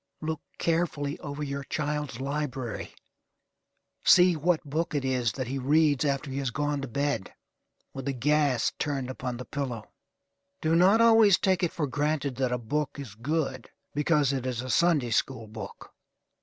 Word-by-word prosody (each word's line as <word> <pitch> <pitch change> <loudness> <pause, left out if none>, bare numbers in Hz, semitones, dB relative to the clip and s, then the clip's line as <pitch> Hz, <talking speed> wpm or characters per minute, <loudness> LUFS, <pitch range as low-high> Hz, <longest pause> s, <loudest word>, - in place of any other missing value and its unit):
Look 160 -1 -3 0.2
carefully 160 -4 -1
over 145 0 -5
your 140 -1 -4
child's 150 -3 -3
library; 135 -4 -4 1.1
see 180 -1 +6
what 160 +2 +1
book 160 +3 -2
it 140 -2 0
is 125 -4 +1
that 130 - -3
he 135 +3 -3
reads 145 +1 +3
after 140 0 -1
he 135 - -2
has 135 -2 -1
gone 145 +2 -1
to 135 - -4
bed, 140 -4 -2 0.6
with 135 -1 -6
the 140 - 0
gas 140 -2 +2
turned 135 -3 -2
upon 125 -1 -4
the 125 - -7
pillow. 125 -8 -5 0.7
Do 160 +1 +1
not 190 +6 +5
always 225 -4 +6
take 190 -3 +1
it 175 - +1
for 155 - -1
granted 145 -1 -1
that 130 -2 0
a 125 - +1
book 145 +6 -2
is 135 -7 -7
good 135 +2 -2 0.2
because 150 -1 +2
it 130 -1 -2
is 125 -1 -2
a 130 - -3
Sunday 155 -9 +3
school 115 0 0
book. 110 +1 -9
140 Hz, 170 wpm, -28 LUFS, 130-155 Hz, 1.1 s, see